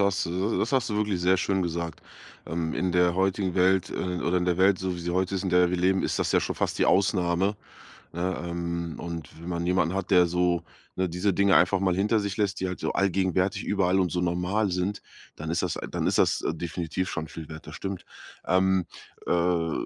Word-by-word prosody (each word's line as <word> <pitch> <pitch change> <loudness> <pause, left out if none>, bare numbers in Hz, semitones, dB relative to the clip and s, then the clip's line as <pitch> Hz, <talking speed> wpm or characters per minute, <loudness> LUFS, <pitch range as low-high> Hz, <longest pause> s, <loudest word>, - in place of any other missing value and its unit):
hast 100 -2 +1
du 95 +6 -1
das 115 - -1
hast 130 -4 +1
du 105 - -1
wirklich 105 -4 0
sehr 90 +2 +4
schön 95 0 0
gesagt, 85 -2 -4 0.4
ähm, 80 -1 -2
in 90 +1 0
der 90 0 +3
heutigen 95 0 0
Welt 95 0 +3
äh, 90 -1 -3
oder 90 +1 +1
in 90 - -1
der 90 -1 0
Welt, 95 0 +4
so 95 -1 -2
wie 90 - -7
sie 85 +1 -3
heute 95 +1 0
ist, 95 - -3
in 95 - -1
der 90 -1 +4
wir 90 - 0
leben, 95 +2 +2
ist - - -1
das - - 0
ja - - +4
schon - - -3
fast - - -1
die - - +5
Ausnahme, 95 0 +2 0.6
ne, 90 +2 -2
ähm, 85 -1 -3
und 85 -2 -6
wenn 85 - -7
man 85 0 -2
jemanden 90 -1 +1
hat, 95 +1 -3
der 90 -1 +6
so, 90 0 +1 0.3
ne, 95 0 0
diese 90 +4 0
Dinge 100 -2 +4
einfach 95 +2 +3
mal 95 -2 +2
hinter 105 +3 +2
sich 100 -1 -3
lässt, 100 -3 -1
die 95 - -1
halt 90 - -5
so - - -2
allgegenwärtig 95 -1 +1
überall 95 -2 +2
und 90 -3 +1
so 90 - 0
normal 90 +4 0
sind, 90 +3 -2 0.3
dann 80 +1 -6
ist 85 +2 0
das 90 - -1
dann - - -2
ist - - +1
das - - +2
definitiv 85 +2 -3
schon 80 -2 -3
viel 80 0 -9
wert. 80 -1 -10
Das 75 - -9
stimmt. 95 -2 -5 0.4
Ähm, 95 -1 +2 0.4
äh, 85 -2 +1
90 Hz, 225 wpm, -26 LUFS, 85-95 Hz, 0.6 s, der